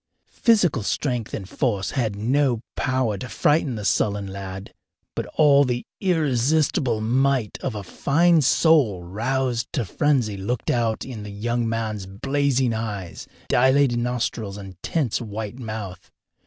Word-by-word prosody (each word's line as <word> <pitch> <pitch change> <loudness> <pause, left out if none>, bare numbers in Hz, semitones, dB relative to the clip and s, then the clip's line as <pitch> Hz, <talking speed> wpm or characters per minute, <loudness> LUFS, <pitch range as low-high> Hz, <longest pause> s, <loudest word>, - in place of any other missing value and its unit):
Physical 195 - +3
strength 120 +2 -2
and 95 - -5
force 105 -5 -1
had 115 -7 -1
no 125 +3 +1 0.2
power 130 -7 0
to 125 - -6
frighten 145 -4 +1
the 105 -2 -5
sullen 100 0 +1
lad, 95 0 -7 0.4
but - - -3
all 145 -2 +6
the 125 -2 -2
irresistible 150 - +1
might 130 0 +1
of 130 -5 -3
a 105 - -5
fine 165 - +3
soul 130 - +3
roused 120 +6 -1
to 125 - 0
frenzy 125 -4 +1
looked 110 +5 -2
out 115 -2 0
in 125 -5 -7
the 105 - -7
young 115 +3 -1
man's 110 -4 -3
blazing 135 +4 0
eyes, 105 -6 -5 0.2
dilated 130 -1 +3
nostrils, 120 -4 -2
and 95 -2 -9
tense 135 -8 -1
white 110 +1 -6
mouth. 110 -6 -6
120 Hz, 140 wpm, -23 LUFS, 105-135 Hz, 0.4 s, all